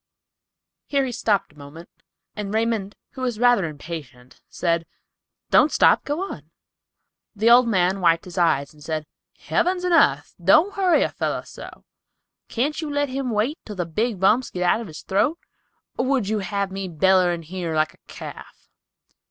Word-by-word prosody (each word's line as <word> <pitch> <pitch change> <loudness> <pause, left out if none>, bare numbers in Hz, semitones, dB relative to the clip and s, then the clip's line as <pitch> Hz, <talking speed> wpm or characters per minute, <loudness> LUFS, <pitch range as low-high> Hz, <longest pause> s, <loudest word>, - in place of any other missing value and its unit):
Here 280 -2 +1
he 255 - -3
stopped 210 -8 0
a - - -24
moment, 150 +4 -11 0.5
and 205 -2 -5
Raymond, 220 -2 -1 0.2
who 260 - -9
was 245 -4 -2
rather 245 -5 +4
impatient, 145 -5 -9
said, 170 -1 -1 0.6
"Don't - - +5
stop; - - +4
go 295 +4 -2
on." 155 - -8 0.9
The 220 +3 +3
old 245 0 +7
man 190 -2 +1
wiped 165 -1 +3
his 180 -2 -10
eyes, 160 -6 +1
and 150 -1 -17
said, 155 0 -3 0.3
"Heavens 360 0 0
and 360 -1 +1
arth, 330 - +3
don't 330 +6 +5
hurry 370 -3 +3
a - - 0
feller - - -3
so; - - -11 0.7
can't 285 +7 -1
you 310 - -4
let 285 -1 0
him 265 0 -3
wait 230 +8 -1
till 210 - -8
the 180 -2 -2
big 210 +5 -2
bumps 215 +7 +3
get 180 - -3
out 180 +6 +2
of 230 - -7
his 155 - -10
throat, 210 - +1 0.6
or 250 - +1
would 265 -7 +1
you 215 0 0
have 200 0 -2
me 195 0 -4
bellerin' 175 0 +2
here 170 -1 -4
like 155 0 +1
a - - -25
calf?" - - -11
200 Hz, 175 wpm, -23 LUFS, 170-250 Hz, 0.9 s, old